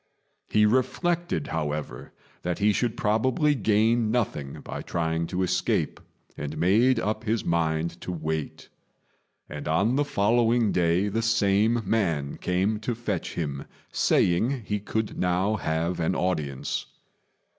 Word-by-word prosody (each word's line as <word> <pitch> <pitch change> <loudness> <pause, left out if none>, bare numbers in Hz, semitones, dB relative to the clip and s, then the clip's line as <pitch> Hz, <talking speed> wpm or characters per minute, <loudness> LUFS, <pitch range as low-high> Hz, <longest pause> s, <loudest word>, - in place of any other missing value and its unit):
He 105 0 +4
reflected, 160 +9 0
however, 75 -5 -4 0.3
that 90 -1 -2
he 105 +1 +3
should 115 +3 -1
probably 130 +8 +2
gain 110 -1 +2
nothing 100 - -2
by - - -6
trying 80 0 -1
to 90 +2 -1
escape, 90 - 0 0.4
and 75 - -5
made 115 +8 +4
up 110 0 -2
his 110 0 0
mind 85 0 0
to - - -5
wait; 80 -2 -4 0.8
and 75 0 -7
on 100 - +2
the 145 - +3
following 115 -2 +2
day 85 +3 +2
the 110 +3 -1
same 115 0 +2
man 85 -10 0
came 95 +4 0
to 115 +2 -2
fetch 105 -6 -3
him, 70 -4 -3 0.3
saying 115 +9 +2
he 105 0 -1
could 110 +2 -3
now 90 +4 +1
have 85 0 -1
an 85 +2 0
audience. 75 -7 -2
100 Hz, 135 wpm, -26 LUFS, 85-115 Hz, 0.8 s, He